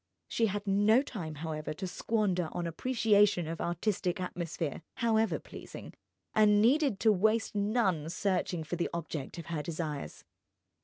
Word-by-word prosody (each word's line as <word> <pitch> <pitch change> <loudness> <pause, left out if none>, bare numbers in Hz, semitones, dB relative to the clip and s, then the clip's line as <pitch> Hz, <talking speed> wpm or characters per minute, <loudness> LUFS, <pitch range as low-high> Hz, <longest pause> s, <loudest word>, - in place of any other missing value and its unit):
She 230 - +1
had 205 0 -3
no 205 +5 +4
time, 170 - -6
however, 155 -1 -4
to 190 - -4
squander 185 -3 0
on 175 - -2
appreciation 205 -1 +2
of 165 0 -4
artistic 180 +1 -1
atmosphere, 170 -4 -3
however 225 -2 +2
pleasing, - - -10 0.4
and 210 -1 +5
needed 255 -1 +3
to 220 - +5
waste 220 +3 +2
none 200 -7 +1
searching 180 -2 -1
for 175 +3 -4
the 170 - -1
object 160 -3 -5
of 170 - -6
her 165 -3 -3
desires. 155 - -5
185 Hz, 145 wpm, -31 LUFS, 165-215 Hz, 0.4 s, and